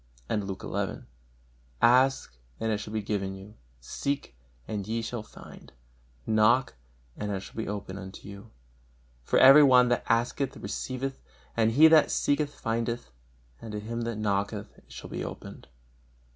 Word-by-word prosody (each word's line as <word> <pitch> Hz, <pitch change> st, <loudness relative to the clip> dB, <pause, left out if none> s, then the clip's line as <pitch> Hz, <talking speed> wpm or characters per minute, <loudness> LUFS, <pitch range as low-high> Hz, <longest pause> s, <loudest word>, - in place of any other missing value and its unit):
And 105 Hz, +4 st, -2 dB
Luke 95 Hz, -1 st, -6 dB
xi: -, -, -3 dB, 0.8 s
"Ask, 130 Hz, -, +3 dB, 0.2 s
and 110 Hz, 0 st, -1 dB
it 105 Hz, -, 0 dB
shall 105 Hz, -, -7 dB
be 110 Hz, -1 st, -2 dB
given 100 Hz, -2 st, -2 dB
you; 95 Hz, +2 st, -12 dB, 0.3 s
seek, 140 Hz, -, -4 dB, 0.3 s
and 105 Hz, -2 st, -4 dB
ye 115 Hz, +1 st, -2 dB
shall 115 Hz, 0 st, -4 dB
find; 70 Hz, -8 st, -14 dB, 0.5 s
knock, 110 Hz, +4 st, +3 dB, 0.4 s
and 105 Hz, 0 st, -4 dB
it 95 Hz, -1 st, -3 dB
shall -, -, -12 dB
be 110 Hz, -, -4 dB
opened 100 Hz, -1 st, -5 dB
unto 95 Hz, +1 st, -10 dB
you; 100 Hz, +2 st, -11 dB, 0.7 s
for -, -, 0 dB
every 135 Hz, +3 st, +9 dB
one 125 Hz, -3 st, +6 dB
that 120 Hz, -, +1 dB
asketh 120 Hz, +3 st, 0 dB
receiveth; 135 Hz, +1 st, -4 dB, 0.3 s
and 115 Hz, -1 st, +2 dB
he 155 Hz, +6 st, +8 dB
that 160 Hz, -1 st, +6 dB
seeketh 145 Hz, 0 st, 0 dB
findeth; 115 Hz, -, -2 dB, 0.5 s
and 110 Hz, -, -8 dB
to 105 Hz, -, -3 dB
him 115 Hz, +3 st, -5 dB
that 115 Hz, -1 st, -3 dB
knocketh 100 Hz, -1 st, -2 dB
it -, -, -22 dB
shall -, -, -9 dB
be -, -, -4 dB
opened. -, -, -9 dB
110 Hz, 160 wpm, -28 LUFS, 100-125 Hz, 0.8 s, every